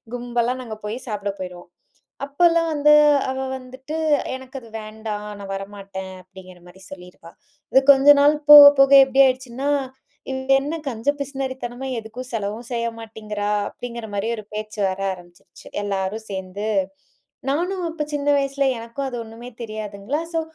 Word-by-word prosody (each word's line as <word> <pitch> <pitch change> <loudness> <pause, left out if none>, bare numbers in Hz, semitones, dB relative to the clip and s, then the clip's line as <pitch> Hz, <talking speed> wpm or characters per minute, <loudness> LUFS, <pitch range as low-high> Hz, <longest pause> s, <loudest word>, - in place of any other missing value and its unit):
கும்பலா 240 0 -1
நாங்க 220 -3 -7
போய் 215 +3 -4
சாப்பிட 205 -2 -3
போயிருவோம். 180 -1 -8 0.6
அப்போலாம் 330 +3 +2
வந்து 300 +1 +5 0.4
அவ 265 - -4 0.2
வந்துட்டு, 260 +5 -8 0.4
எனக்கு 260 +1 -9
அது 230 - -15
வேண்டாம். 215 -1 -6
நான் 195 0 -6
வரமாட்டேன். 195 -1 -8
அப்படிங்கிற 185 -1 -14
மாரி 190 +2 -16
சொல்லிருவா. 180 -2 -12 0.4
இது 265 - +7
கொஞ்ச 275 +1 +2
நாள் 295 +1 +5
போக 290 -1 +13
போக 275 0 +5
எப்டி 270 +1 +4
ஆயிடுச்சுன்னா, 260 +2 -2 0.6
இவ 265 - -3 0.2
என்ன 300 +4 -4
கஞ்ச 230 +2 -5
பிசுனறித்தனமா, 265 -2 -5
எதுக்கும் 230 +3 -9
செலவும் 215 +1 -4
செய்ய 235 0 -1
மாட்டேங்கிறா, 210 -2 -5 0.2
அப்படிங்கிற 235 -2 -7
மாரி 200 +2 -2
ஒரு 215 - -9
பேச்சு 215 0 -6
வர 185 +1 -4
ஆரம்பிச்சுருச்சு. 175 -1 -15 0.2
எல்லாரும் 200 +2 -3
சேந்து, 190 +2 -5 0.8
நானும் 355 +5 -1
அப்ப 305 -2 -3
சின்ன 290 0 -3
வயசுல 275 0 0
எனக்கும் 235 +4 -5
அது 245 - -6
ஒண்ணுமே 230 +2 -11
தெரியாதுங்களா, 215 +5 -4
ஸோ 325 - 0
230 Hz, 145 wpm, -22 LUFS, 205-270 Hz, 0.8 s, போக